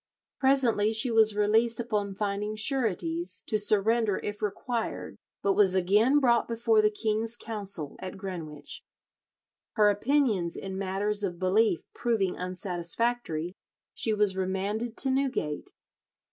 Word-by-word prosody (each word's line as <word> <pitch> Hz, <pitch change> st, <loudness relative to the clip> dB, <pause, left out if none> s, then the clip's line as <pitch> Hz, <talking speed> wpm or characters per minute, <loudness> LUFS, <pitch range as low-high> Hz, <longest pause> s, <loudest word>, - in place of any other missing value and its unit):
Presently 250 Hz, -6 st, +2 dB
she 235 Hz, +3 st, +2 dB
was 220 Hz, -2 st, +5 dB
released 220 Hz, +3 st, +2 dB
upon 210 Hz, -4 st, -2 dB
finding 210 Hz, +1 st, -2 dB
sureties 185 Hz, -, 0 dB
to 215 Hz, -, 0 dB
surrender 210 Hz, +1 st, +2 dB
if 205 Hz, 0 st, -5 dB
required, 225 Hz, +3 st, -3 dB, 0.3 s
but 200 Hz, -, +3 dB
was 190 Hz, -2 st, +3 dB
again 210 Hz, +9 st, +3 dB
brought 240 Hz, -4 st, +3 dB
before 230 Hz, -1 st, +2 dB
the 210 Hz, -, +3 dB
king's 220 Hz, +2 st, -2 dB
council 200 Hz, -10 st, -3 dB
at 185 Hz, +1 st, -7 dB
Greenwich. 170 Hz, -6 st, -6 dB, 0.9 s
Her 210 Hz, -2 st, +4 dB
opinions 210 Hz, -6 st, +1 dB
in 190 Hz, -1 st, -6 dB
matters 200 Hz, +2 st, -1 dB
of 180 Hz, -3 st, -2 dB
belief 185 Hz, 0 st, +2 dB
proving 220 Hz, -6 st, 0 dB
unsatisfactory, 180 Hz, 0 st, -2 dB, 0.4 s
she 225 Hz, -, 0 dB
was 210 Hz, -2 st, +2 dB
remanded 200 Hz, +5 st, -2 dB
to 270 Hz, -, +2 dB
Newgate. 260 Hz, -, -2 dB
210 Hz, 125 wpm, -28 LUFS, 190-230 Hz, 0.9 s, was